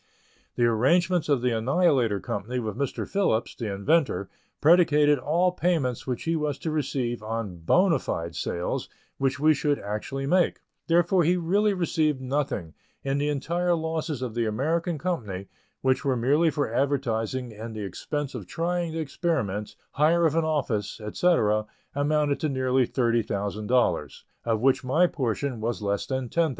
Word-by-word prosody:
The 120 - +2
arrangements 165 +10 +2
of 135 -4 +2
the 125 -2 +2
Annihilator 125 - +2
Company 105 +6 -4
with 110 -4 -3
Mr. 140 +2 -3
Phillips, 190 - 0
the 110 -3 -4
inventor, 130 - +1 0.3
predicated 150 -3 +5
all 170 +7 +2
payments 160 -10 -1
which 125 -2 -2
he 165 0 0
was 150 -3 -1
to 160 - -3
receive 130 -6 -2
on 110 -4 -4
bona 165 - +3
fide 85 -6 -4
sales 85 0 -3 0.3
which 135 +1 0
we 155 +2 +5
should 145 0 0
actually 110 +7 -4
make; 180 +5 +2 0.3
therefore 175 +2 +3
he 175 +3 +3
really 200 +4 +2
received 160 -5 +1
nothing, 130 - -2 0.3
and 140 +1 0
the 145 - +1
entire 170 +5 0
losses 160 -4 -3
of 120 -3 -4
the 120 -1 0
American 160 - -1
Company, 110 - -3 0.3
which 130 0 +1
were 135 -3 +1
merely 145 +8 +3
for 145 -7 -2
advertising 125 -3 -1
and 110 +1 -7
the 105 -2 -4
expense 145 - -4
of 110 -8 -7
trying 170 - -2
the 165 - -3
experiments, 135 - -2 0.2
hire 165 +3 +3
of 155 - +3
an 165 0 +2
office, 125 -11 -1
etc., 110 -2 +1 0.3
amounted 145 0 +1
to 155 - 0
nearly 130 -2 +1
$30,000, 115 -1 0 0.2
of 115 -2 0
which 135 +1 +3
my 145 +8 +3
portion 130 -4 -2
was 115 -1 -2
less 100 0 -1
than 130 -2 -2
$10,000. 165 +6 +1
135 Hz, 160 wpm, -26 LUFS, 115-160 Hz, 0.3 s, predicated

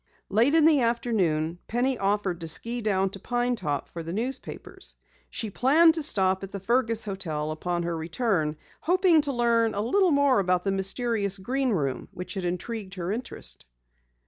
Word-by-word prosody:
Late 235 +9 +3
in 320 -2 +5
the 305 -4 +5
afternoon 185 -9 0
Penny 250 +3 0
offered 195 -4 -1
to 165 - -5
ski 235 +9 +3
down 195 -3 0
to 195 - -8
Pine 245 +3 -1
Top 145 -9 -3
for 170 - -7
the 165 0 -6
newspapers. 245 +7 -5 0.3
She 220 -3 -4
planned 315 - +5
to 325 - -1
stop 190 -9 +1
at 195 - -6
the 200 - -5
Fergus 230 +2 +1
hotel 160 -7 -3
upon 175 +2 -2
her 170 0 -2
return, 160 -2 -1 0.2
hoping 355 -1 +3
to 290 -1 -2
learn 235 -3 +1
a 205 - -1
little 365 - +2
more 280 -5 +3
about 180 -2 +1
the 195 - 0
mysterious 200 +1 0
Green 260 +7 -1
Room 140 - -1
which 180 0 -7
had 190 -3 -4
intrigued 190 +3 -4
her 180 0 -3
interest. 230 - -5
205 Hz, 175 wpm, -26 LUFS, 180-245 Hz, 0.3 s, in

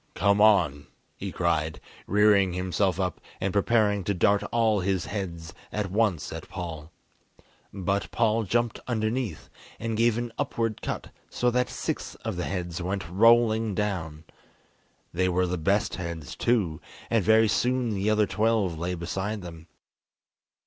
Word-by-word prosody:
"Come 100 +2 +3
on," 85 -10 +4 0.3
he - - -5
cried, 80 +1 0 0.3
rearing 100 -2 +4
himself 90 0 0
up 90 -3 -2 0.2
and 95 0 -1
preparing 105 -1 +2
to 100 - 0
dart 100 +3 +3
all 110 -3 +3
his 95 -1 0
heads 85 -4 -5 0.2
at 105 -3 -2
once 100 -8 0
at 80 - -8
Paul. 80 -4 -6 0.8
But 100 +1 -2
Paul 115 -1 +2
jumped 120 +3 0
underneath, 110 - -2 0.3
and 115 0 -2
gave 115 0 +3
an 120 -1 -4
upward 115 -2 -1
cut - - -4 0.2
so 125 0 +1
that 125 +1 +1
six - - -4
of 110 -3 -2
the 90 - -2
heads 90 -2 -4
went 95 +2 -3
rolling 110 +2 +4
down. 85 -7 -3 0.9
They 90 +2 +1
were 90 +1 +2
the 90 -1 -2
best 100 +6 +1
heads 85 -7 -6
too, 100 -10 0 0.3
and 115 -4 +3
very 110 +2 +5
soon 125 +2 +1
the 100 +1 0
other 110 0 +3
twelve 105 -6 0
lay 90 +2 -2
beside 95 +4 -3
them. 85 -2 -10
100 Hz, 150 wpm, -27 LUFS, 90-110 Hz, 0.9 s, very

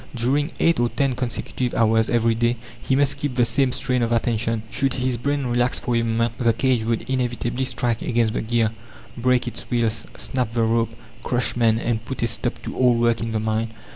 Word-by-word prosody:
During 135 +6 +1
eight 165 -4 +3
or 120 0 +2
ten 135 0 0
consecutive 125 0 -3
hours 110 0 +3
every 115 -1 +3
day 120 +1 +1 0.2
he 130 - +1
must 140 0 +2
keep 140 -3 -3
the 120 -1 +4
same 130 +3 +2
strain 125 0 0
of 115 0 0
attention. 115 -1 0
Should 135 -1 0
his 130 -1 0
brain 140 +3 -1
relax 120 +1 +1
for 120 - -1
a 115 - +3
moment, 115 0 -1
the 115 -2 +3
cage 125 -1 +1
would 115 0 0
inevitably 125 0 -1
strike 120 -2 -1
against 115 -2 +1
the - - -1
gear, 115 -1 +1 0.4
break 125 +1 +1
its 120 - -4
wheels, 115 -2 0
snap 125 -3 -2
the 115 -1 +1
rope, 115 0 +2 0.3
crush 125 0 0
men, 115 -2 +3
and 115 -1 -1
put 120 0 -4
a - - +3
stop 120 +2 -3
to - - -6
all 125 -2 +4
work 115 0 +2
in 115 0 -3
the 110 - 0
mine. 110 +1 -1
120 Hz, 210 wpm, -23 LUFS, 115-125 Hz, 0.4 s, the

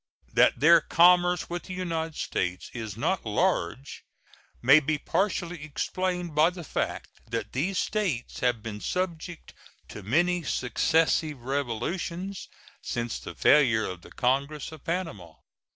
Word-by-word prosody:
That - - +4
their 165 +4 +7
commerce 175 +1 +4
with 175 0 -5
the 185 - -6
United 165 -3 -3
States 90 0 -3
is 110 -4 -6
not 190 +11 0
large 140 - -1 0.6
may 135 +5 +7
be 155 +1 -1
partially 175 0 -1
explained 180 +3 -2
by 155 +3 +5
the 180 -1 -9
fact - - -3 0.2
that 115 0 -3
these 180 +9 -1
States 185 - -2
have 120 -3 0
been 105 -2 -6
subject 175 -2 -4 0.4
to 105 - -8
many 175 - +1
successive 155 +1 +1
revolutions 145 - -3 0.3
since 120 -1 -3
the - - -9
failure 125 -7 +4
of 90 -2 -7
the - - -14
congress 140 +4 -1
of 160 -3 -12
Panama. 110 - -4
155 Hz, 135 wpm, -27 LUFS, 120-175 Hz, 0.6 s, their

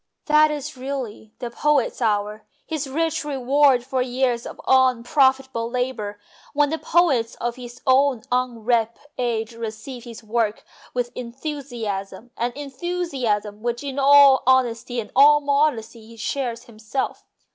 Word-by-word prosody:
That 305 0 +5
is 295 -3 -5
really 255 -5 -6
the 240 -2 -6
poet's 285 0 +1
hour, 210 -1 0 0.2
his 310 -3 -3
rich 320 +3 -1
reward 275 -2 +3
for 260 0 -1
years 250 -1 0
of - - -10
unprofitable 260 -1 +3
labour, 240 -5 -3 0.4
when 290 0 +3
the 320 - -2
poets 275 -10 +2
of 240 0 -3
his 245 -1 -10
own 265 -2 +3
unripe 235 -2 0 0.2
age 230 -2 -1
receive 230 +2 -7
his 230 -1 -10
work 220 -1 -1 0.3
with 245 -1 -1
enthusiasm 240 -5 -5
an 240 +1 -1
enthusiasm 270 - -3
which 240 +2 -2
in 280 -1 -4
all 280 -1 +7
honesty 245 -2 +2
and 210 - -6
all 295 +2 +7
modesty 280 -6 0
he 230 0 -14
shares 240 0 -3
himself. 225 +3 -4
250 Hz, 135 wpm, -23 LUFS, 230-280 Hz, 0.4 s, all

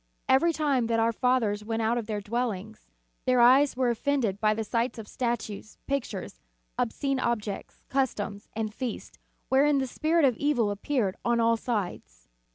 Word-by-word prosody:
Every 270 +6 +4
time 285 -7 +1
that 230 0 +1
our 225 +1 +3
fathers 230 -4 +1
went 225 +1 -2
out 225 +2 +2
of 235 -3 -3
their 210 -2 -2
dwellings, 220 -1 -4 0.4
their 255 -1 +3
eyes 260 +3 +6
were 255 -2 +2
offended 235 -5 0
by 215 0 +3
the 220 - -2
sight 235 +3 -1
of 220 -2 -8
statues, 220 -4 -4
pictures, 235 - -4 0.3
obscene 275 +3 -1
objects, 215 -5 -3
customs, 210 -6 -2
and 215 -1 -2
feasts, 245 0 -6 0.3
wherein 280 +2 +4
the 270 - +1
Spirit 315 +4 +2
of 250 -4 +2
evil 245 -8 +1
appeared 205 -1 -1
on 235 0 +2
all 230 0 +4
sides. 180 - -4
235 Hz, 165 wpm, -27 LUFS, 215-265 Hz, 0.4 s, eyes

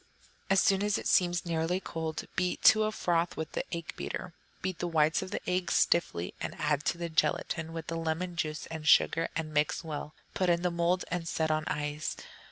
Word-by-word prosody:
As 195 0 +5
soon 195 0 +3
as 205 0 +1
it - - -6
seems 175 -1 +3
nearly 170 +2 0
cold, 160 -3 -4
beat 180 0 -1
to 215 0 +7
a 215 - 0
froth 175 -4 0
with 160 -1 -4
the - - -2
egg 170 -1 -4
beater. 180 - -5 0.3
Beat 185 -2 -2
the 175 - -1
whites 160 -1 +3
of 190 - -5
the - - -5
eggs 180 0 0
stiffly, 90 - +2
and - - -4
add 145 - 0
to - - +1
the 170 0 -3
gelatine, 160 +1 0
with 165 -1 -5
the 165 - -3
lemon 165 +2 -2
juice 155 -2 -2
and 160 -1 -5
sugar, 165 0 +5
and 155 -1 -3
mix 150 +3 +1
well. 150 -1 -6 0.2
Put 185 -2 +1
in 170 +1 +2
a 180 - +2
mould 170 +2 +1
and 175 -2 -2
set 160 -1 0
on 155 0 0
ice. 150 +1 -2
165 Hz, 210 wpm, -30 LUFS, 155-180 Hz, 0.3 s, to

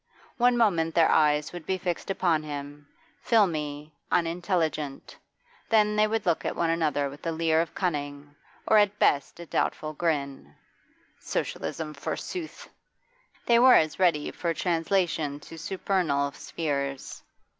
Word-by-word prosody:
One 245 0 +3
moment 170 -8 +2
their 165 -1 +5
eyes 150 0 +2
would 175 -3 -8
be 190 - 0
fixed 175 -1 -4
upon 175 -5 +1
him, 145 -1 -7 0.3
filmy, 155 -8 0 0.2
unintelligent, 165 -4 -1 0.5
then 210 -1 +3
they 210 0 +4
would 220 0 -2
look 170 -3 +1
at - - -2
one 165 -1 +1
another 155 -4 0
with 140 +1 -11
a - - 0
leer 160 0 +2
of 165 - -5
cunning, 145 -4 -3 0.3
or 215 - +6
at 205 0 +2
best 140 -1 +1
a 170 - -8
doubtful 155 -1 -2
grin. 140 - -3 0.6
Socialism, 155 -2 -4
forsooth! 320 - -6 0.8
They 235 -1 +5
were 255 +1 +8
as 155 +1 +2
ready 165 -5 +2
for 170 -2 -2
translation 165 -4 0
to 165 - -11
supernal 165 -6 -1
spheres. 140 -4 -4
165 Hz, 135 wpm, -27 LUFS, 145-185 Hz, 0.8 s, were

